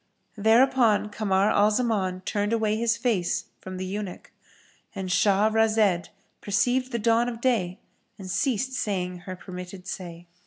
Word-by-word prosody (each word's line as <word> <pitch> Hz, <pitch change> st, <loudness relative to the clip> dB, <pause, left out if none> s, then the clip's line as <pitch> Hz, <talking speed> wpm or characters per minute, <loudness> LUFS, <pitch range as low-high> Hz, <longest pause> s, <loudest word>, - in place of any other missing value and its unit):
Thereupon 225 Hz, 0 st, +3 dB
Kamar 200 Hz, -1 st, +1 dB
al 205 Hz, 0 st, +4 dB
Zaman 210 Hz, -5 st, 0 dB
turned 205 Hz, +3 st, -1 dB
away 220 Hz, -2 st, +1 dB
his 230 Hz, +1 st, +1 dB
face 210 Hz, -9 st, -1 dB
from 185 Hz, 0 st, -8 dB
the 185 Hz, -, -4 dB
eunuch,—And 190 Hz, 0 st, -8 dB
Shah 195 Hz, +2 st, +3 dB
razed 215 Hz, -5 st, +2 dB, 0.3 s
perceived 245 Hz, +5 st, +1 dB
the 235 Hz, -, -1 dB
dawn 230 Hz, +2 st, +2 dB
of 230 Hz, -2 st, -7 dB
day 215 Hz, -8 st, 0 dB, 0.4 s
and 195 Hz, -, -9 dB
ceased 255 Hz, +6 st, 0 dB
saying 180 Hz, -7 st, -2 dB
her 185 Hz, -, -4 dB
permitted 180 Hz, 0 st, -9 dB
say. 175 Hz, -2 st, -7 dB
210 Hz, 140 wpm, -26 LUFS, 185-230 Hz, 0.4 s, al